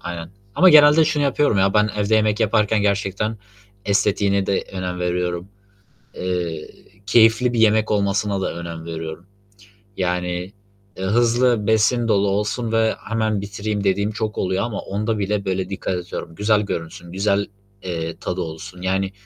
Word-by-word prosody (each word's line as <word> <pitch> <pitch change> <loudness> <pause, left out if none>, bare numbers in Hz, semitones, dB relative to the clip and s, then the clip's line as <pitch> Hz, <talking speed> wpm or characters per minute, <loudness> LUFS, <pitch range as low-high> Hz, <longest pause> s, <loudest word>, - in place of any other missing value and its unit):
aynen 85 -1 -6 0.2
ama 185 - +6
genelde 150 0 +7
şunu 155 -1 0
yapıyorum, 140 -5 +2
ya, 95 0 +2
ben 105 0 +3
evde 105 +1 +1
yemek 110 0 +2
yaparken 105 -1 +2
gerçekten 100 +2 -1 0.5
estetiğine 100 -1 +1
de, 100 - +1
eee, - - -15
önem 90 -1 -4
veriyorum. 90 0 -2 0.7
Eee, 90 -4 -3 0.4
keyifli 115 +3 +4
bir 115 - 0
yemek 110 -1 +3
olmasına 100 -1 0
da - - -2
önem 85 -1 -7
veriyorum. 80 +1 -6 0.7
Yani, 90 0 -2 0.4
eee, 95 - -5
hızlı 120 +1 +2
besin 115 +2 +2
dolu 100 -2 +2
olsun 105 +4 -1
ve 110 0 +2
hemen 110 -2 0
bitireyim 100 +1 -4
dediğim 100 +2 +1
çok 110 -1 -4
oluyor 95 +1 0
ama 115 -4 -4
onda 105 +2 -2
bile 100 0 -1
böyle 95 0 -2
dikkat 95 -1 -3
ediyorum. 85 -2 -7
Güzel 105 +3 +2
görünsün, 85 -2 -6
güzel, 100 +1 +1 0.4
eee, 85 -2 -4
tadı 90 0 -4
olsun. 90 +3 -7
Yani, 95 +1 -1
100 Hz, 155 wpm, -21 LUFS, 90-110 Hz, 0.7 s, genelde